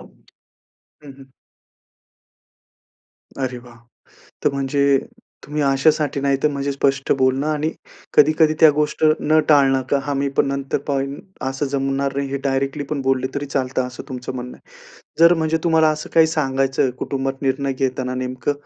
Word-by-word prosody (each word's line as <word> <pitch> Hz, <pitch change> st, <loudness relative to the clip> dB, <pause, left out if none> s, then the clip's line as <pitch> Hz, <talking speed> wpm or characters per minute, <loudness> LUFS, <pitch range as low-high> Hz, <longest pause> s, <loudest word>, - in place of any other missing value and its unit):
हं, -, -, -21 dB, 0.8 s
हं. 135 Hz, -1 st, -15 dB, 2.1 s
अरे 130 Hz, -2 st, -3 dB
वाह! 120 Hz, -1 st, -15 dB, 0.7 s
तर 150 Hz, -, +4 dB
म्हणजे 140 Hz, 0 st, +2 dB, 0.5 s
तुम्ही 150 Hz, +1 st, -3 dB
अशासाठी 145 Hz, +2 st, +2 dB
नाही 140 Hz, -1 st, +1 dB
तर, -, -, +5 dB
म्हणजे 140 Hz, 0 st, -2 dB
स्पष्ट 140 Hz, 0 st, 0 dB
बोलणं 130 Hz, +2 st, +1 dB
आणि 155 Hz, +1 st, -1 dB, 0.4 s
कधी, 150 Hz, +1 st, +6 dB
कधी 155 Hz, -1 st, +5 dB
त्या 160 Hz, -, +8 dB
गोष्ट 150 Hz, +1 st, -1 dB, 0.2 s
न 155 Hz, +1 st, +3 dB
टाळणं. 135 Hz, -3 st, +4 dB
का 140 Hz, -, +3 dB
आम्ही 140 Hz, 0 st, 0 dB
पण -, -, +4 dB
नंतर 140 Hz, 0 st, -2 dB
पाहून 140 Hz, 0 st, -2 dB, 0.3 s
असं 135 Hz, +2 st, -3 dB
जमणार 135 Hz, 0 st, -1 dB
नाही 140 Hz, 0 st, -1 dB
हे 140 Hz, -, -2 dB
डायरेक्टली 135 Hz, +1 st, -1 dB
पण 150 Hz, -2 st, -2 dB
बोलले 130 Hz, -1 st, 0 dB
तरी 140 Hz, 0 st, -2 dB
चालतं 130 Hz, -2 st, -2 dB
असं 125 Hz, -, -9 dB
तुमचं 125 Hz, -1 st, -6 dB
म्हणणं 125 Hz, 0 st, -7 dB
आहे. -, -, -22 dB, 0.4 s
जर 170 Hz, +1 st, +7 dB
म्हणजे 160 Hz, -1 st, 0 dB
तुम्हाला 160 Hz, -2 st, +4 dB
असं 155 Hz, 0 st, -5 dB
काही 160 Hz, -1 st, +6 dB
सांगायचं 135 Hz, -4 st, 0 dB
कुटुंबात 135 Hz, 0 st, -3 dB
निर्णय 135 Hz, 0 st, 0 dB
घेताना 130 Hz, -1 st, -2 dB
नेमकं 130 Hz, +1 st, -2 dB
140 Hz, 155 wpm, -20 LUFS, 135-150 Hz, 2.1 s, त्या